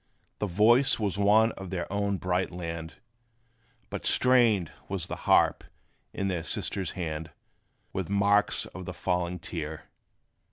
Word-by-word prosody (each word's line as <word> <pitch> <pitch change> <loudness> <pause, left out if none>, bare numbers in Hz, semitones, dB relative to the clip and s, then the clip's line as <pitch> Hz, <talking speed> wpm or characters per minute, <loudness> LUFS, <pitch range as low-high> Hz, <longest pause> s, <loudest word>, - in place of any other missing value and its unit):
The 105 - -1
voice 120 +9 +4
was 100 -2 -1
one 110 +3 +4
of 95 -3 -9
their 90 -2 -3
own 100 -1 0
bright 90 0 -1
land; 85 -2 -6 1.0
But - - -5
stained 120 -9 +3 0.2
was 95 -3 -2
the - - -5
harp - - +4 0.5
in 100 - -2
their 90 -3 -1
sister's 90 +2 -1
hand, 80 -3 -4 0.6
With 95 -2 -3
marks 100 +1 +2
of 95 0 -9
the 90 - -6
falling 90 -1 -1
tear. 80 -2 -7
95 Hz, 135 wpm, -28 LUFS, 85-100 Hz, 1.0 s, voice